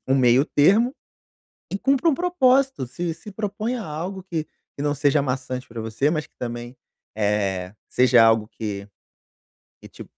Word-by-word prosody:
um 135 Hz, -, +4 dB
meio 130 Hz, 0 st, +4 dB
termo, 215 Hz, -, +3 dB, 0.8 s
e 195 Hz, -, -1 dB
cumpre 275 Hz, +6 st, +2 dB
um 315 Hz, -, +4 dB
propósito, 270 Hz, -, +2 dB
se 165 Hz, +6 st, -4 dB
se 210 Hz, -, -12 dB
proponha 215 Hz, +4 st, -3 dB
algo 180 Hz, +3 st, -5 dB
que 165 Hz, -4 st, -2 dB, 0.3 s
que 140 Hz, -, -4 dB
não 145 Hz, 0 st, +1 dB
seja 145 Hz, 0 st, +2 dB
maçante 130 Hz, -1 st, -3 dB
pra 115 Hz, -1 st, -7 dB
você, 115 Hz, +7 st, 0 dB
mas 155 Hz, -2 st, -2 dB
que -, -, -44 dB
também, 120 Hz, +1 st, -6 dB, 0.4 s
eh, 100 Hz, -3 st, -1 dB
seja 125 Hz, -2 st, +5 dB
algo 110 Hz, -1 st, +3 dB
que 100 Hz, -2 st, -6 dB, 0.9 s
que -, -, -12 dB
te -, -, -11 dB
145 Hz, 160 wpm, -23 LUFS, 120-200 Hz, 0.9 s, seja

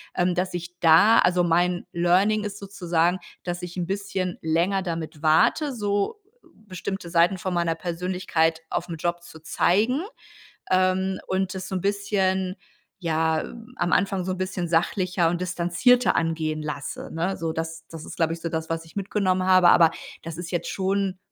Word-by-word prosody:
ähm, 180 Hz, 0 st, +2 dB
dass 180 Hz, +1 st, -1 dB
ich 175 Hz, 0 st, -6 dB
da 170 Hz, +7 st, +6 dB
also 180 Hz, 0 st, +3 dB
mein 175 Hz, +1 st, +1 dB
Learning 190 Hz, +5 st, +2 dB
ist 205 Hz, 0 st, -5 dB
sozusagen, 180 Hz, -3 st, 0 dB, 0.2 s
dass 175 Hz, 0 st, -4 dB
ich 175 Hz, 0 st, -6 dB
'n 175 Hz, -, -1 dB
bisschen 190 Hz, -1 st, -3 dB
länger 170 Hz, +5 st, +1 dB
damit 165 Hz, -4 st, -5 dB
warte, 210 Hz, -, +3 dB
so 205 Hz, -, -1 dB, 0.3 s
bestimmte 190 Hz, -3 st, -6 dB
Seiten 175 Hz, +2 st, +3 dB
von 185 Hz, 0 st, -3 dB
meiner 170 Hz, -1 st, +1 dB
Persönlichkeit 170 Hz, -1 st, -1 dB
aufm 170 Hz, -1 st, -3 dB
Job 175 Hz, +2 st, -2 dB
zu 160 Hz, -2 st, -13 dB
zeigen, 210 Hz, -, +2 dB, 0.7 s
ähm, 185 Hz, 0 st, +2 dB
und 190 Hz, 0 st, -1 dB
das 185 Hz, -, -5 dB
so 190 Hz, -, -4 dB
'n 185 Hz, -, -1 dB
bisschen 190 Hz, -2 st, 0 dB, 0.4 s
ja, 160 Hz, -2 st, +1 dB, 0.4 s
am 175 Hz, -5 st, -1 dB
Anfang 195 Hz, -1 st, +1 dB
so 185 Hz, -, -2 dB
'n 185 Hz, -, -3 dB
bisschen 185 Hz, -2 st, -3 dB
sachlicher 175 Hz, 0 st, +1 dB
und 175 Hz, +1 st, -2 dB
distanzierter 180 Hz, +8 st, +2 dB
angehen 160 Hz, -2 st, -1 dB
lasse, 145 Hz, -2 st, -5 dB
ne? 175 Hz, +4 st, -1 dB
So 165 Hz, -1 st, -3 dB
das 165 Hz, 0 st, -5 dB
das 165 Hz, -1 st, -9 dB
ist, -, -, -9 dB
glaube 165 Hz, -1 st, +1 dB
ich, 165 Hz, -, -7 dB
so 170 Hz, -, -4 dB
das, 160 Hz, 0 st, -3 dB
was 165 Hz, 0 st, -3 dB
ich 160 Hz, -, -18 dB
mitgenommen 190 Hz, -2 st, 0 dB
habe, 185 Hz, -2 st, +6 dB
aber 165 Hz, -1 st, +6 dB, 0.3 s
das 165 Hz, -1 st, -7 dB
ist 175 Hz, 0 st, -6 dB
jetzt 175 Hz, -, -2 dB
schon 195 Hz, 0 st, -1 dB
180 Hz, 170 wpm, -25 LUFS, 165-190 Hz, 0.7 s, da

